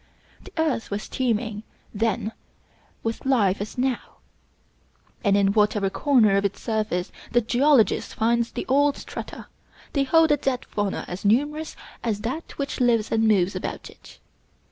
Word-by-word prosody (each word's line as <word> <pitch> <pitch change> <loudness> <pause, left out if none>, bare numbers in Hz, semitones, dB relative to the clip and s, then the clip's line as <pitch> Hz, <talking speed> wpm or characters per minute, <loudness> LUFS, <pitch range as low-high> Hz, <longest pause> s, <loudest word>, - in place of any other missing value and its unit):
The - - -13
earth 310 -8 0
was 205 +1 -4
teeming 225 -4 -1 0.3
then 220 0 -1 0.7
with 225 0 -3
life 210 -8 +2
as 210 - -6
now; 255 -1 -2 1.1
and 200 -2 +4
in 200 0 +3
whatever 210 -2 +2
corner 230 -9 +4
of 200 - +1
its 200 0 -2
surface 210 -5 -2 0.2
the 240 - +4
geologist 245 +1 +2
finds 235 +1 +1
the - - -4
old 285 +2 +3
strata, - - -8 0.5
they 280 - +2
hold 325 +3 +4
a 295 - +4
dead 265 -2 -2
fauna 205 -2 -2
as 180 +2 -6
numerous 290 +9 +1 0.3
as 215 -3 -1
that 260 +9 -5
which 280 -1 -3
lives 230 -3 +2
and 225 0 +3
moves 195 -3 +3
above - - -5
it. - - -16
225 Hz, 150 wpm, -24 LUFS, 205-265 Hz, 1.1 s, and